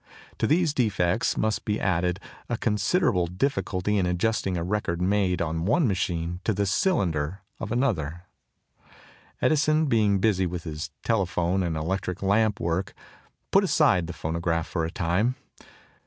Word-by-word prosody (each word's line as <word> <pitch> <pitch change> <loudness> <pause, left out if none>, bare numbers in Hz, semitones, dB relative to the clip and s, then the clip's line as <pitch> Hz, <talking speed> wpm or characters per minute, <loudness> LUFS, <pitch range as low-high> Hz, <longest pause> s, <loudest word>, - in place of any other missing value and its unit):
To - - +2
these 160 -1 +2
defects 105 -6 +1
must 110 -1 0
be 105 0 -1
added 90 0 0 0.3
a 120 - -1
considerable 105 - +1
difficulty 100 -1 -1
in 90 - +1
adjusting 95 +1 0
a 85 - -2
record 90 -2 -1
made 90 -2 +1
on 80 0 -2
one 130 - +3
machine 90 -3 -1
to 110 - 0
the 100 +1 +1
cylinder 95 - 0 0.2
of 110 - -5
another 90 - -1 0.6
machine. - - -26 0.5
Edison, 155 +1 +3
being 110 -7 +3
busy 95 -2 +2
with 85 -1 -5
his 75 -1 -5
telephone 95 -4 +1
and 85 -3 -1
electric 90 +3 -3
lamp 105 +1 +2
work, 85 +3 -2 0.6
put - - +5
aside 90 -3 +3
the 85 - -5
phonograph 85 +1 -1
for 85 -3 -2
a - - -3
time. 90 +8 0
95 Hz, 150 wpm, -26 LUFS, 85-110 Hz, 0.6 s, put